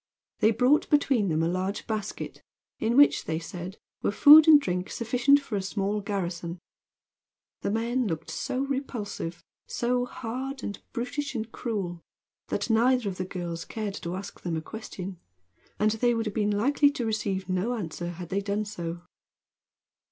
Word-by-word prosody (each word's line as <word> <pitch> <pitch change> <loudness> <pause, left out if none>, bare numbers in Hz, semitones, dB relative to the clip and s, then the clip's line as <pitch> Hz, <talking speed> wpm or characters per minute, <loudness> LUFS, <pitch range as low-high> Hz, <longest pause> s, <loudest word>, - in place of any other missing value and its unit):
They 215 - +5
brought 250 +6 +3
between 270 -9 +3
them 160 0 +1
a - - +2
large 185 +3 -2
basket, 215 -2 -4 0.4
in 230 +3 +1
which, 290 0 +6
they 160 - -1
said, 175 +3 -7 0.2
were - - +1
food 300 +8 +9
and 305 -2 +9
drink 180 -7 -2
sufficient 250 +4 +3
for 275 -6 -5
a 200 - 0
small 200 +2 -1
garrison. 180 -4 -3 1.0
The - - -1
men 235 +3 0
looked 165 -3 -4
so 255 - -2
repulsive, 245 -11 -4 0.2
so 245 +1 0
hard 260 +3 -5
and 200 - -5
brutish 265 +4 -3
and 225 -1 -3
cruel, 190 -9 -3 0.5
that - - -1
neither 240 +1 +3
of 185 - -6
the 185 - -2
girls 175 -2 -5
cared 215 -3 -4
to 170 +1 -4
ask 195 +2 -8
them 170 -2 -2
a - - -3
question; 190 -3 -7 0.6
and 215 +1 +3
they 240 +2 +2
would 225 0 -1
have 210 - -3
been 210 -1 +1
likely 285 +6 +4
to 270 -4 -3
receive 200 -4 -1
no 190 +6 0
answer 175 -4 -4
had 175 0 -7
they 200 +1 0
done 200 +1 -1
so. 175 -4 -5
210 Hz, 165 wpm, -27 LUFS, 185-245 Hz, 1.0 s, food